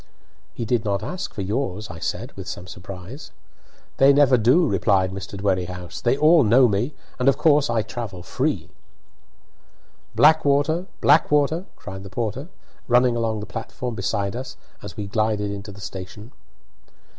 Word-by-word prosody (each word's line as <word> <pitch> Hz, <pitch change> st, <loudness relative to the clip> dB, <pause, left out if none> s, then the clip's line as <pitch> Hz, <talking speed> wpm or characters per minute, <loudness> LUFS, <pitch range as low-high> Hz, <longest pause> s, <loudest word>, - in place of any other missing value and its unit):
"He 115 Hz, -, -4 dB
did 115 Hz, 0 st, 0 dB
not 100 Hz, -3 st, -1 dB
ask 190 Hz, +2 st, -5 dB
for 100 Hz, -, -5 dB
yours," 105 Hz, 0 st, -3 dB
I 80 Hz, -, -9 dB
said, -, -, -4 dB
with -, -, -10 dB
some 90 Hz, -, -6 dB
surprise. 90 Hz, -, -9 dB, 0.7 s
"They 135 Hz, +1 st, +7 dB
never 140 Hz, -2 st, +5 dB
do," 125 Hz, +9 st, +4 dB
replied 95 Hz, -7 st, +2 dB
Mr. 95 Hz, +1 st, -7 dB
Dwerrihouse; 90 Hz, -3 st, -2 dB
"they 120 Hz, +2 st, +2 dB
all 155 Hz, +1 st, +6 dB
know 120 Hz, +4 st, +5 dB
me, 115 Hz, +7 st, -1 dB, 0.2 s
and 125 Hz, +2 st, +4 dB
of 140 Hz, -, +2 dB
course 150 Hz, -4 st, +3 dB
I 115 Hz, -2 st, +1 dB
travel 110 Hz, -5 st, -6 dB
free." -, -, -2 dB, 1.4 s
"Blackwater! 155 Hz, +2 st, +3 dB
Blackwater!" 150 Hz, +3 st, +3 dB
cried 95 Hz, -1 st, -9 dB
the 95 Hz, -, -9 dB
porter, 115 Hz, -, -3 dB, 0.4 s
running 125 Hz, 0 st, +4 dB
along 110 Hz, -2 st, -1 dB
the -, -, -5 dB
platform 120 Hz, +2 st, -6 dB
beside 100 Hz, 0 st, -2 dB
us 130 Hz, +1 st, -7 dB, 0.2 s
as 100 Hz, -4 st, -9 dB
we 105 Hz, -, -3 dB
glided 105 Hz, 0 st, -1 dB
into 100 Hz, +1 st, -7 dB
the 100 Hz, -, -13 dB
station. 95 Hz, +5 st, -8 dB
115 Hz, 155 wpm, -23 LUFS, 100-135 Hz, 1.4 s, They